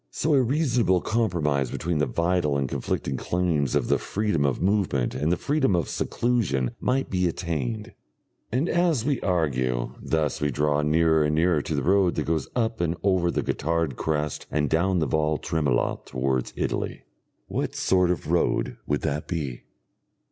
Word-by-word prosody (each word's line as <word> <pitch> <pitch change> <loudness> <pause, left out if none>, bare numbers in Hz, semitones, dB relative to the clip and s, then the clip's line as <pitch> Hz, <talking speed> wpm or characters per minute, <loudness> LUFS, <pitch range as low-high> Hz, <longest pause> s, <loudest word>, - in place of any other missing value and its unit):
So 155 - 0
a 135 - +5
reasonable 125 - +2
compromise 85 - 0
between 85 +3 -2
the 75 - +2
vital 85 -4 +1
and 70 -1 0
conflicting 65 +1 -2
claims 85 -6 0
of - - +1
the - - +2
freedom 105 -8 0
of 70 - -1
movement 90 - +1
and 75 +5 0
the 90 - +2
freedom 140 -9 +1
of 85 -5 -1
seclusion 110 - 0
might 135 +1 0
be 90 -1 +2
attained.... 105 +7 -3 0.6
And 130 +8 +1
as 170 -10 +1
we 140 -3 +1
argue 65 -9 0
thus 80 -3 -1
we 75 - +1
draw 75 +2 +1
nearer 80 +1 +3
and 75 +1 +1
nearer 80 -1 +3
to 75 - -3
the 70 - -1
road 95 +1 +3
that 75 - 0
goes 80 -1 -1
up 115 -3 0
and 85 0 0
over 95 -3 +2
the - - -1
Gotthard 80 -2 -1
crest 75 0 -2
and 75 -2 0
down 90 +3 +2
the 80 - +1
Val 75 -1 +1
Tremola 75 -7 0
towards 65 -1 -1
Italy. - - -3 0.4
What - - -3
sort 90 -2 +2
of 90 -4 -2
road - - +1
would 75 - 0
that 75 -1 -2
be? 70 -8 -4
85 Hz, 170 wpm, -25 LUFS, 75-100 Hz, 0.6 s, a